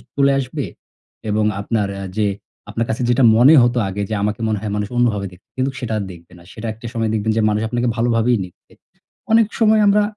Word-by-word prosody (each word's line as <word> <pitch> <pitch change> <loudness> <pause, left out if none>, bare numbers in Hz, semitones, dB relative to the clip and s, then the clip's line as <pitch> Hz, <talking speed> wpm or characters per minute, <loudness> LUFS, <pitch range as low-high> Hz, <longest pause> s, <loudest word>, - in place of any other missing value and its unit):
চলে 140 0 +3
আসবে 130 -2 -4 0.6
এবং 105 0 +1 0.2
আপনার 105 -1 -1
আ - - -5
যে 105 -1 +2 0.4
আপনার 115 +2 -2
কাছে 115 +3 -2
যেটা 120 +1 +3
মনে 125 +7 +7
হতো 120 +1 +1
আগে 100 +2 -4
যে - - -3
আমাকে 105 +2 -1
মনে 105 -2 -1
হয় 105 -2 -4
মানুষ 105 -1 -2
অন্যভাবে 110 -5 +1
দেখবে, 90 +1 -19
কিন্তু 130 +1 0
সেটা 120 -3 -4
আর 105 - -2
দেখবে 85 0 -15
না। 85 - -16
সেটা 115 +1 -6
একটা 115 +2 -14
সময় 115 -2 -1
দেখবেন 110 0 0
যে - - +3
মানুষ 105 +1 0
আপনাকে 120 0 -1
ভালোভাবেই 115 0 +2
নিচ্ছে। 90 -1 -15 0.6
অনেক 225 -1 +5
সময় 220 -1 +4
আমরা 205 +1 +4
115 Hz, 215 wpm, -19 LUFS, 105-125 Hz, 0.6 s, মনে